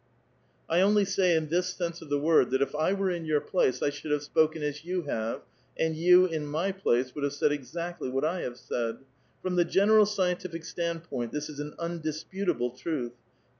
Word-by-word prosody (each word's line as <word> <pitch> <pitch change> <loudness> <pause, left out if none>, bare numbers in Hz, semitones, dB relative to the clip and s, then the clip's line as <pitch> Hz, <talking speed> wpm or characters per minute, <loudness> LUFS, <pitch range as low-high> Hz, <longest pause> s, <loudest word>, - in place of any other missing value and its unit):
1 165 - +2
only 205 +2 +4
say 190 -3 +2
in 155 -1 0
this 180 +2 +1
sense 170 -1 -3
of 160 - -10
tlie 145 0 +1
word, 155 -3 +4
that 130 - +1
if - - -4
I 155 +4 +1
were 195 -1 0
in 170 -2 -3
your 155 -2 +2
place 145 -5 0
I 145 - +2
should 145 +2 -8
have 150 -1 +1
sjKiken 155 +1 +1
as 150 +1 -3
you 180 +1 -2
have, 115 -6 -3 0.3
and 160 -1 0
you 180 +3 +6
in 160 -4 -3
my 160 +7 0
place 130 -10 0
would 145 - -5
have 145 0 0
said 145 +1 +2
exactly 165 +3 -4
what 135 +3 0
I 175 +3 0
have 120 0 -5
said. 115 -2 -3 0.5
From 180 -1 -1
the 175 - +6
general 205 +4 +5
scientific 180 -4 -1
stand[>oint, 165 -8 -3
this 150 0 -4
is 145 -1 -8
an 150 0 -5
undisputable 170 -3 -2
truth. 125 -2 -4
160 Hz, 205 wpm, -28 LUFS, 145-180 Hz, 0.5 s, you